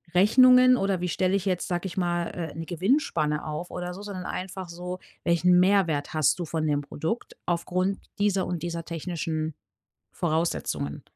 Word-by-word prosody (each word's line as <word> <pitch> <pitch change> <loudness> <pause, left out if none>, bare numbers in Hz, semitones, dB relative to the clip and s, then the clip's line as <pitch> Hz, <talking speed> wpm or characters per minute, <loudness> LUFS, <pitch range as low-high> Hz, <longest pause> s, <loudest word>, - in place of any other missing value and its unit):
Rechnungen, 255 +6 +7
oder 195 -3 0
wie 180 - 0
stelle 185 +1 0
ich 200 -1 -1
jetzt, 185 -2 0
sage 175 0 -2
ich 175 - -8
mal, 175 -1 0
äh, 165 -3 -5
'ne 165 +1 -5
Gewinnspanne 170 - 0
auf 155 +3 -5
oder 180 0 -4
so, 190 - -9
sondern 200 -3 -6
einfach 190 0 -5
so: 180 +2 -6 0.2
„Welchen 180 +1 +4
Mehrwert 180 -7 +2
hast 155 +1 +3
du - - -1
von 160 0 -2
dem 145 -1 +1
Produkt 160 +9 -4
aufgrund 180 +3 0 0.2
dieser 200 -2 +2
und 175 -2 -3
dieser 170 -1 -3
technischen 160 -1 -3 0.6
Voraussetzungen?“ 160 - -1
175 Hz, 165 wpm, -26 LUFS, 165-190 Hz, 0.6 s, Rechnungen